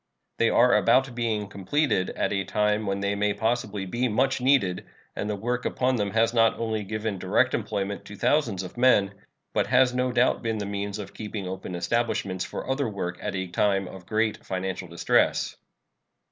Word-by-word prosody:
They 115 - +4
are 125 +1 +5
about 120 +5 +3
being 115 -3 -1
completed 100 +1 0
at - - 0
a 100 -1 0
time 105 +1 0
when 100 0 -1
they 100 0 0
may 100 0 0
possibly 105 -2 -1
be 120 +7 -1
much 130 +4 +1
needed, 125 -9 +2 0.3
and 105 - -3
the 105 - -1
work 120 +5 -2
upon 130 0 0
them 105 -2 0
has 115 +3 +2
not 115 -1 +4
only 110 -2 -2
given 105 0 -3
direct - - +2
employment 100 0 -2
to 105 - -9
thousands 115 -8 +1
of 90 - -9
men, 105 -6 +4 0.4
but - - +1
has 125 0 +4
no 125 0 0
doubt 120 +1 +2
been 115 -2 -1
the 105 - -3
means 100 0 -3
of 100 -2 -8
keeping 105 -3 -5
open 95 -1 -5
establishments 100 -1 -1
for - - -6
other 130 -2 0
work 90 -3 -4
at - - -3
a 95 0 -2
time 95 +2 +1
of 90 -1 -11
great 110 -1 0
financial 95 0 -4
distress. 85 0 +1
105 Hz, 190 wpm, -26 LUFS, 100-120 Hz, 0.4 s, are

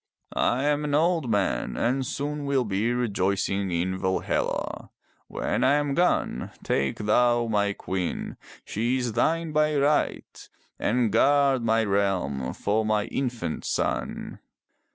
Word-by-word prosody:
I 125 +3 +1
am 145 0 +1
an 145 -1 0
old 165 -3 +2
man 100 - 0
and 130 +3 +1
soon 145 +3 -3
will 135 -3 +1
be 105 +3 0
rejoicing 100 -4 0
in 90 +2 -1
Valhalla. 95 0 -2 0.4
When 125 - -2
I 135 +3 +4
am 145 -1 0
gone, 175 - +1
take 70 -1 0
thou 120 +3 +3
my 100 -2 +1
queen 95 -2 -4 0.2
— - - -20
she 120 +5 0
is 125 -3 -2
thine 160 +7 +1
by 150 0 +2
right, 145 +2 0 0.3
and 120 -1 +1
guard 140 +3 +4
my 115 0 +2
realm 95 -11 0
for 105 +2 0
my 110 -1 +1
infant 120 - -3
son. - - -2
120 Hz, 135 wpm, -26 LUFS, 100-140 Hz, 0.4 s, I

